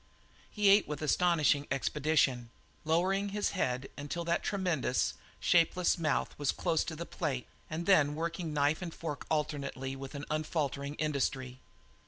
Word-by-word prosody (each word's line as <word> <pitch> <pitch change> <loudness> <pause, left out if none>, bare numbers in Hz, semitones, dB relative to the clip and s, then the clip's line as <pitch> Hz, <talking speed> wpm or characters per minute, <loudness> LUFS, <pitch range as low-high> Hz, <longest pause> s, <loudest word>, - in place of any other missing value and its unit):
He 205 -2 +3
ate 200 +1 +6
with 150 +1 -4
astonishing 155 -3 +3
expedition, 135 -3 +1 0.4
lowering 190 +5 +2
his 205 +1 -1
head 130 -8 -1 0.2
till 170 +2 -3
that 170 0 +1
tremendous, 180 -10 0 0.3
shapeless 175 +1 +3
mouth 155 -3 0
was 145 -2 +2
close 160 - 0
to 160 - -4
the 170 +2 -5
plate 140 -9 -3 0.2
and 160 +2 -3
then 150 -7 +4
working 165 +1 -3
knife 150 +2 +1
and 175 -2 -4
fork 155 -3 -6
alternately 140 -3 -2
with 135 +2 -8
an 140 +1 -5
unfaltering 150 -2 -2
industry. 135 -4 -1
155 Hz, 145 wpm, -32 LUFS, 140-170 Hz, 0.4 s, ate